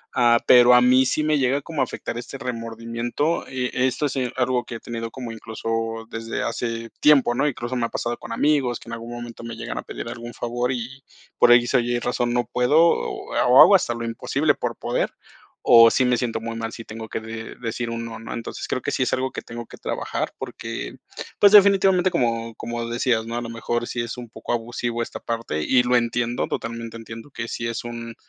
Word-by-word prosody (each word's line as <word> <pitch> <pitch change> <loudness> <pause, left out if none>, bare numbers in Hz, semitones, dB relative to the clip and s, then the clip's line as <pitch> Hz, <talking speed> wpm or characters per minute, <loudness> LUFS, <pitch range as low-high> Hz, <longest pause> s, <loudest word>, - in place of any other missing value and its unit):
Ah, 120 -1 +5
pero 125 0 +8
a 125 - +7
mí 130 +1 +5
sí 155 +4 0
me 155 0 +2
llega 135 +1 +1
como 155 -1 -3
a - - +5
afectar 120 - -5
este 125 +3 -7
remordimiento, 115 +4 -2
eh, 125 -1 -2 0.2
esto 130 +3 0
si 135 -1 -2
es 125 -1 -3
algo 125 -1 +1
que 115 - -7
he - - -6
tenido 115 0 -5
como, 125 -2 -6
incluso, 115 0 -4
desde 115 0 -4
hace 115 0 -3
tiempo, 140 -5 +5
¿no? 135 +4 +2
Incluso, 120 -2 -3
me 120 -2 0
ha - - -4
pasado 120 0 -3
con - - -10
amigos, 140 -5 +1
que - - -13
en - - -6
algún 115 +1 -7
momento 120 -1 -8
me 115 0 -6
llegan 115 0 -6
a - - -3
pedir - - -7
algún 120 0 -7
favor 120 +2 -2
y, 130 +2 -5 0.3
por 120 - +6
X 120 +2 +5
o - - +6
Y 120 0 0
razón 120 0 -1
no 120 -1 +1
puedo, 125 +5 +3
o 165 - +1
ha - - +3
hago - - +8
hasta 120 - +2
lo 115 0 -5
imposible 140 +6 0
por 120 -1 -3
poder, 120 - -1 0.5
o 115 -1 +8
sí 130 - +2
me 125 0 +3
siento 115 -2 -2
muy 115 0 -5
mal 115 0 -4
si 115 - -9
tengo 110 0 -8
que - - -3
de 110 0 -8
decir 115 0 -4
un 115 0 -4
no, 115 -1 -7
¿no? 115 - -7
Entonces, 115 - -6
creo 130 - -2
que - - -2
sí - - +1
es 125 - -1
algo 130 0 0
que - - -5
tengo 120 0 -8
que - - -12
trabajar, - - -3
porque, - - -6 0.4
pues, 205 - +7
definitivamente, 195 -3 +6
como 115 -8 -1
como 120 0 -4
decías, 120 -1 +1
¿no? 115 - -4
A 120 - -1
lo 120 - -6
mejor, 120 +1 -2
sí 120 - -3
es 120 +1 -5
un 120 -2 -8
poco 115 - -5
abusivo 120 0 -2
esta - - -7
parte, 115 -9 -3
y 125 +10 +3
lo 125 0 +2
entiendo, 120 0 0
totalmente 115 0 -5
entiendo 115 +3 -10
que 115 -2 -5
sí 115 0 -3
es 115 - -4
un, 115 -1 -7
120 Hz, 230 wpm, -23 LUFS, 115-125 Hz, 0.5 s, pero